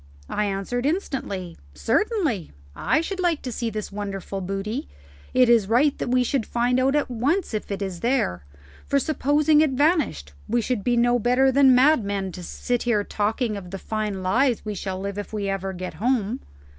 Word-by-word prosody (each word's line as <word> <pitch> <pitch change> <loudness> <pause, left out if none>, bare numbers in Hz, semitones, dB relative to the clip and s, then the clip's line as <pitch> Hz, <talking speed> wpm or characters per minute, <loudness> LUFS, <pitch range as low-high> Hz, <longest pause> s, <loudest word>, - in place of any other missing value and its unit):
I 210 - 0
answered 205 +6 -2
instantly, 245 - -3 0.2
"Certainly; 260 - 0 0.2
I 310 - +1
should 375 +3 -4
like 345 -4 +1
to 255 - -4
see 230 0 -2
this 215 -1 -5
wonderful 195 -1 -5
booty. 195 - -3 0.4
It 255 -1 +4
is 230 -4 +4
right 270 +5 +3
that - - -2
we 250 0 +3
should 255 0 0
find 245 +3 +1
out 270 +2 +2
at 295 -3 0
once 280 - 0
if 215 - -3
it 200 0 -3
is 185 -3 -5
there; 230 - 0 0.4
for 280 - +2
supposing 300 +1 +3
it 310 - +4
vanished 275 - +1
we 240 +2 +1
should 235 -2 -1
be 240 +2 +1
no 240 +1 +3
better 250 +4 +3
than 265 -1 +6
madmen 205 -9 +2
to 180 - -8
sit 245 +7 -3 0.2
talking 220 +3 0
here 205 - -3
of 180 -2 -11
the 195 - -5
fine 210 -2 -3
lives 240 +6 +2
we 210 - -3
shall 190 -1 -4
live 200 +1 -4
if 205 +1 -6
ever 195 -2 -2
we 185 - -9
get 185 0 -5
home." 240 0 0
235 Hz, 190 wpm, -24 LUFS, 195-265 Hz, 0.4 s, than